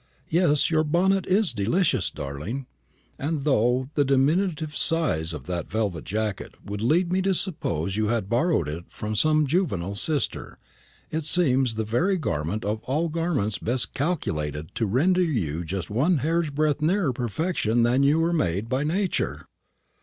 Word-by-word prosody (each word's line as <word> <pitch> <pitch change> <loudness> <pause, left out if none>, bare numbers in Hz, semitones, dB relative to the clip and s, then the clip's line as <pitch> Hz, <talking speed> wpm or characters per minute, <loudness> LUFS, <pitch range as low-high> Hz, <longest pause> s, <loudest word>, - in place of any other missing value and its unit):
Yes, 160 -3 +3
your 155 -1 +3
bonnet 185 +5 +2
is 195 -2 +2
delicious, 110 - +1
darling; 75 - -5 0.5
and 145 0 -2
though 130 -1 +2
the 145 - +3
diminutive 150 +3 +1
size 155 - +1
of 75 -5 -7
that 90 0 -4
velvet 100 -6 -2
jacket 105 -1 -3
would 100 0 -5
lead 170 +9 +2
me 190 - +2
to 190 0 +1
suppose 95 - -2
you 110 0 0
had 115 -3 0
borrowed 120 - +1
it 80 +4 -5
from 110 0 -5
some 155 +6 +4
juvenile 130 - 0
sister, 145 +6 -1 0.5
it 160 -1 -2
seems 135 -8 +2
the 110 - -1
very 170 - +1
garment 85 - -2
of 105 +1 -2
all 155 +6 0
garments 150 - -1
best 120 +2 0
calculated 80 - -2
to 115 - -1
render 170 - +2
you 90 - -1
just 95 +4 -5
one 150 - +2
hair's 160 +3 0
breadth 150 +1 0
nearer 165 -3 +2
perfection 120 - 0
than 125 +3 +3
you 140 +3 +4
were 165 +1 +1
made 100 - 0
by 130 +2 0
Nature." 185 +5 -1
135 Hz, 160 wpm, -25 LUFS, 105-165 Hz, 0.5 s, some